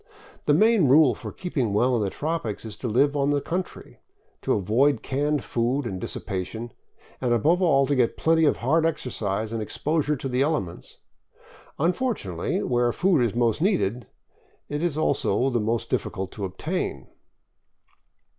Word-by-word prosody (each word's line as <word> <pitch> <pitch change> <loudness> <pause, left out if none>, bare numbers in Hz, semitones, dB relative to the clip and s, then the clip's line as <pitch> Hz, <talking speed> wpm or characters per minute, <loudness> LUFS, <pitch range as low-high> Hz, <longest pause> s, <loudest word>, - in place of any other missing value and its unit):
The - - +5
main 220 -7 +4
rule 140 -1 +6
for - - -8
keeping 135 - -2
well 125 +5 +3
in 115 - 0
the 100 - 0
tropics 145 - -3
is 110 - -7
to 125 - -4
live 140 +6 +2
on 140 0 +1
the 145 0 +2
country, 180 +6 -5 0.4
to - - +1
avoid 115 +7 +2
canned 145 +1 0
food 125 +4 -1
and 95 -5 -4
dissipation, 110 +5 -5 0.5
and 125 -2 0
above 165 - +2
all 140 -6 +4
to 145 - 0
get 125 -3 +1
plenty 160 0 +3
of 145 - +2
hard 155 +7 +2
exercise 110 -9 -2
and 115 - -2
exposure 150 +7 -1
to 135 - -5
the 125 0 0
elements. 140 - -2 0.8
Un 170 +5 +2
fortunately, 170 - -2
where 120 -1 +1
food 175 0 +2
is 115 -3 0
most 120 +3 +1
needed, 125 - 0 0.6
it 145 +1 -3
is 170 -4 -1
most 120 -5 0
difficult 95 0 -2
to 100 - -5
obtain. 95 -1 -3
130 Hz, 155 wpm, -25 LUFS, 110-155 Hz, 0.8 s, rule